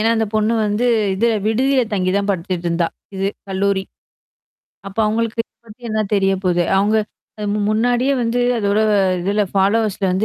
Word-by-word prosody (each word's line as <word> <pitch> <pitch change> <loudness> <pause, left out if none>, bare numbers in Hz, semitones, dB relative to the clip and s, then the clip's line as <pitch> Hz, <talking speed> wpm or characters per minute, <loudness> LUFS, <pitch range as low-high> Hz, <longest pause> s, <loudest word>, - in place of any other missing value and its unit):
ஏன்னா, 225 +1 +2
அந்த 220 0 +1
பொண்ணு 215 +1 +2
வந்து 210 +3 0 0.3
இது 215 +5 +1 0.2
விடுதியில 260 +4 +2
தங்கி 185 -2 0
தான் 200 0 -1
படிச்சிட்டு 180 -1 -3
இருந்தா. 170 0 +1 0.3
இது 195 +1 -1 0.2
கல்லூரி. 195 0 0 1.0
அப்ப 195 - -9
அவங்களுக்கு 225 +1 -1 0.3
பத்தி 225 +3 -15
என்னா 215 0 0
தெரிய 195 -1 +2
போகுது. 175 -1 +2
அவங்க 205 +3 +2 0.4
அது 210 -1 -4
மு 210 - -1
முன்னாடியே 245 +5 +2
வந்து 235 +1 0 0.2
அதோட 205 -2 +1 0.4
இதுல 200 +4 +1
ஃபாலோவர்ஸ்ல 200 +1 +1
வந்து 190 +4 +1
210 Hz, 160 wpm, -19 LUFS, 195-225 Hz, 1.0 s, ஏன்னா